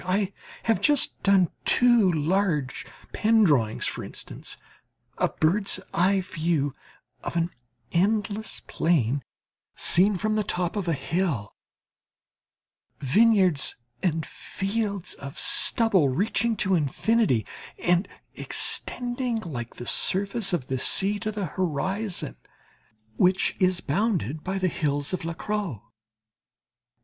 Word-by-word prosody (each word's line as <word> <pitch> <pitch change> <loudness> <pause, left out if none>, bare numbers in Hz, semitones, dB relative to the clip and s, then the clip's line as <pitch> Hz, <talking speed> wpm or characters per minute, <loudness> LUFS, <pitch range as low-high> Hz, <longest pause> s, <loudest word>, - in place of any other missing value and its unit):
I 190 +2 0 0.3
have 225 -1 +1
just 295 -2 +1
done 195 -4 +4
two 240 -6 +5
large 160 -3 -1 0.3
pen 220 0 +3
drawings, 125 - +2
for - - -3
instance, - - -5 0.6
a - - +2
bird's 195 +6 +2
eye 190 +3 +3
view 160 -5 -1 0.5
of - - -5
an 170 0 0 0.4
endless 205 +3 0
plain 140 -5 0 0.5
seen 190 +3 +4
from 215 +4 -1
the 215 0 +1
top 175 -1 -2
of 200 -4 -3
a 165 - +2
hill: 140 - -2 1.5
vineyards, 185 - +3 0.3
and 165 -4 0
fields 200 -1 -3
of 140 +3 -9
stubble 200 - +3
reaching 220 - 0
to 190 0 +2
infinity, 165 - +1 0.3
and 175 +2 +1 0.3
extending 245 0 -1
like 125 - -6
the 120 - -8
surface 200 - +1
of 170 -8 -1
the 130 0 -3
sea 200 +8 +4
to 215 0 -3
the 205 -2 -3
horizon, 185 +5 -2 0.8
which 185 +1 +2
is 185 -2 +2
bounded 160 - -1
by 190 +1 -2
the 185 -1 +1
hills 145 -2 -1
of 185 - -2
La 165 0 -4
Crau. 200 - -4
185 Hz, 120 wpm, -25 LUFS, 155-210 Hz, 1.5 s, two